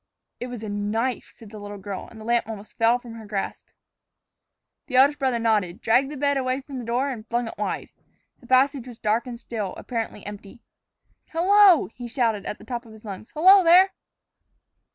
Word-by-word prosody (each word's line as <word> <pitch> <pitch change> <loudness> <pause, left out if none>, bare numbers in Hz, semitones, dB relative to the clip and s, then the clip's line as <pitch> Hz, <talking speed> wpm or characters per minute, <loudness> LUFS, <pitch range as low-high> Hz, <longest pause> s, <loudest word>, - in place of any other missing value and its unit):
"It 245 - -4
was 245 -3 -7
a 215 - -5
knife," 215 +5 -2
said 220 -3 -14
the 215 - -9
little 205 0 -8
girl, 195 -1 -6
and 225 - -13
the 215 - -10
lamp 235 -1 +1
almost 210 -1 -9
fell 230 +1 +3
from 245 -2 -11
her 225 -2 -10
grasp. 200 -2 -4 1.2
The 255 - -4
eldest 280 +3 +5
brother 260 -3 +1
nodded, 215 -5 0
dragged 245 +5 +2
the 295 - -7
bed 285 0 +1
away 255 0 -1
from 270 -1 -8
the 240 - -7
door, 250 +4 0
and 225 -3 -8
flung 240 0 -1
it - - -6
wide. - - -3 0.5
The 240 - -17
passage 260 0 +3
was 240 -2 -10
dark 220 +4 0
and 240 -1 -7
still, 215 -6 -5
apparently 225 -4 -5
empty. 205 +2 -10 0.7
"Hello!" 375 +1 +5
he 245 -1 -8
shouted 230 -4 -1
at - - -4
the - - -15
top 240 -2 -4
of 220 - -13
his 220 0 -15
lungs. 200 +1 -8
"Hello, 375 +5 +7
there!" 360 +3 +6
235 Hz, 200 wpm, -24 LUFS, 215-265 Hz, 1.2 s, Hello